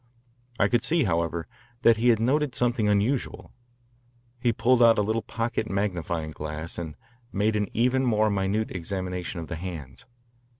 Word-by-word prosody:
I 100 - +5
could 120 +1 +1
see, 165 +1 +2
however, 85 -3 -1 0.4
that 115 -1 +6
he 120 +2 +3
had 115 -2 +4
noted 135 +3 +1
something 120 -3 +1
unusual. 105 +6 0 0.9
He 120 -1 +2
pulled 125 +2 +3
out 115 -1 +7
a 105 - +3
little 110 +2 0
pocket 115 -1 -3
magnifying 85 -5 -2
glass 75 +2 -5
and 80 -3 -6 0.4
made 105 +2 +1
an 105 -1 0
even 125 +3 +2
more 110 -3 +2
minute 100 +2 0
examination 90 -1 -4
of 80 - -7
the 85 - -5
hands. 80 - -8
105 Hz, 160 wpm, -26 LUFS, 85-120 Hz, 0.9 s, out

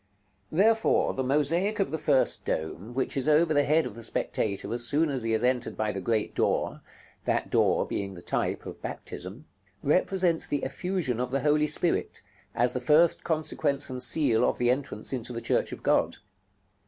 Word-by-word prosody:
§ - - -41 0.5
LXVII. 155 - -5
Therefore 220 +3 +3
the 130 - -2
mosaic 165 +10 +1
of 195 - 0
the 160 - -2
first 130 - +2
dome, 85 +9 -4
which 130 - -1
is 135 +2 0
over 155 +1 +4
the 145 -1 +4
head 155 +2 +3
of - - -6
the 115 - -10
spectator 105 -2 -2
as 120 0 0
soon 150 +4 +2
as 130 -2 -2
he 115 - -3
has 110 +1 0
entered 125 -1 0
by 110 -1 0
the 95 - -5
great 110 +2 -1
door - - 0 0.4
(that - - -1
door - - +3
being 100 -1 -4
the 85 - -11
type - - -2
of - - -9
baptism), 100 - -7 0.4
represents 180 +2 +1
the 145 - -2
effusion 165 -4 -2
of 125 0 -1
the 135 +1 -1
Holy 150 +1 +2
Spirit, 165 +3 0 0.3
as 120 +1 +2
the 125 - -3
first 155 +6 +4
consequence 150 -4 -1
and 130 0 -4
seal 125 -3 +2
of - - +1
the 120 0 +2
entrance 130 -3 -4
into 125 -1 -4
the 115 - -3
Church 115 - 0
of - - -8
God. - - +2
135 Hz, 195 wpm, -27 LUFS, 115-155 Hz, 0.5 s, over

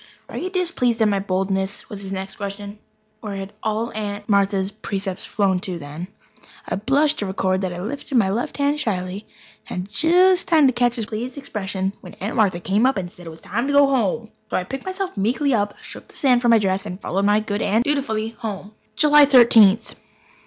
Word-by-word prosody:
"Are - - -7
you 370 - -3
displeased 340 -11 0
at - - +4
my 200 -1 +1
boldness?" 190 0 -2
was 200 -1 -8
his 195 -1 -7
next 190 0 -5
question. 205 0 -6 0.4
Where 210 -3 -6
had 195 +1 -6
all 220 +2 -2
Aunt 205 -1 -5
Martha's 200 -1 +1
precepts 195 -3 -4
flown 195 -3 +1
to 180 -1 -5
then? 155 +3 -7 0.6
I - - -2
blush 280 +8 +2
to 205 - -3
record 190 0 0
that 185 -2 -2
I 175 - -6
lifted 255 +6 -3
my 195 -5 +3
left 240 +8 -3
hand 285 +1 +1
shyly 190 -3 -3 0.4
and 180 - -3
had 200 - -14
just 360 - +4
time 320 -5 +5
to 260 - +4
catch 240 0 +1
his 225 -3 -3
pleased 235 +5 -5
expression 195 -7 -3
when 180 - -11
Aunt 205 +4 -4
Martha 200 -6 +2
came 200 +7 +2
up 265 - +1
and 175 -2 -4
said 175 -2 -13
it - - -5
was 160 0 -12
time 235 +7 -2
to 285 - 0
go 285 0 +7
home. 230 -4 0 0.2
So - - 0
I 185 - -1
picked 270 +8 -7
myself 375 0 -4
meekly 250 +8 +1
up, 205 -2 0
shook - - -10
the - - -20
sand 250 -3 +3
from 240 - +2
my 230 - +7
dress, 195 -1 0
and 180 -1 -6
followed 195 -1 -1
my 205 +1 +4
good 210 -1 -3
aunt 220 +4 +2
dutifully 245 -6 -1
home. 210 -2 -6 0.2
July 295 +2 +6
Thirteenth. 230 -5 +6
210 Hz, 215 wpm, -22 LUFS, 195-250 Hz, 0.6 s, go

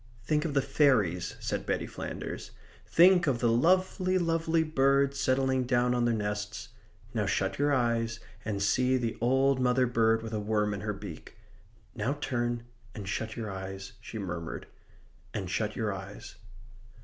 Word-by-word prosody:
"Think 150 +5 +1
of 150 -3 -2
the 140 - +3
fairies," 130 - +2
said - - -3
Betty - - 0
Flanders. - - -6 0.4
"Think 180 0 +6
of 135 -4 +2
the 120 -1 +2
lovely, 185 +7 +3
lovely 165 -1 +1
birds 140 -2 +2
settling 130 0 +2
down 125 0 +2
on 120 -1 +1
their 120 - +2
nests. 105 0 -3 0.4
Now - - 0
shut 95 +3 0
your 145 0 +3
eyes 115 -3 +1 0.2
and 100 -3 -2
see 130 +5 +3
the 115 -3 -2
old 135 +2 +3
mother 125 0 +3
bird 115 -2 +2
with 110 0 -6
a 110 - 0
worm 105 0 0
in 100 - -5
her 105 0 -2
beak. 100 0 -9 0.6
Now 115 +6 -1
turn 120 -3 -1 0.3
and 100 -3 -6
shut 110 +3 -3
your 110 -3 -4
eyes," 95 +2 -7
she 110 - -8
murmured, 90 -5 -5 0.7
"and 95 -3 -2
shut 105 +1 -1
your 110 -3 -1
eyes." 95 +1 -8
120 Hz, 160 wpm, -29 LUFS, 105-135 Hz, 0.7 s, Think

